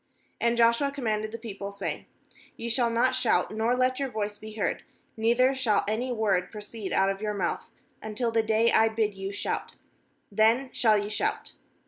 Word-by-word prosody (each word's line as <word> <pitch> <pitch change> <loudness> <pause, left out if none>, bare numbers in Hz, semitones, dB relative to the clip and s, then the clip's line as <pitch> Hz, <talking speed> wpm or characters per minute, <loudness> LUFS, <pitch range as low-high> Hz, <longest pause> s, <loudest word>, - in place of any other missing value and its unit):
10And 235 0 +2
Joshua 235 +4 +4
commanded 215 -6 -2
the 230 - -5
people, 200 -3 -7
saying: 200 0 -5 0.5
'Ye 235 - -4
shall 235 0 +2
not 240 +3 +2
shout, 255 -2 +1
nor 225 +3 +1
let 255 +1 +1
your 275 -1 -1
voice 210 -2 -4
be 215 0 -9
heard, 215 - -1 0.3
neither 240 +4 +3
shall 250 -6 +1
any 235 +4 -1
word 200 -6 0
proceed 210 -1 -7
put 195 0 +3
of 195 +1 -6
your 210 -1 -2
mouth, 185 -4 -2 0.3
until 220 +2 -2
the 225 0 +3
day 220 +1 +2
I 225 0 +5
bid 220 -1 0
you 195 0 -5
shout; 205 - -3 0.6
then 225 +6 +3
shall 220 -3 +4
ye 205 0 -2
shout.' 210 - -2
220 Hz, 180 wpm, -27 LUFS, 210-235 Hz, 0.6 s, I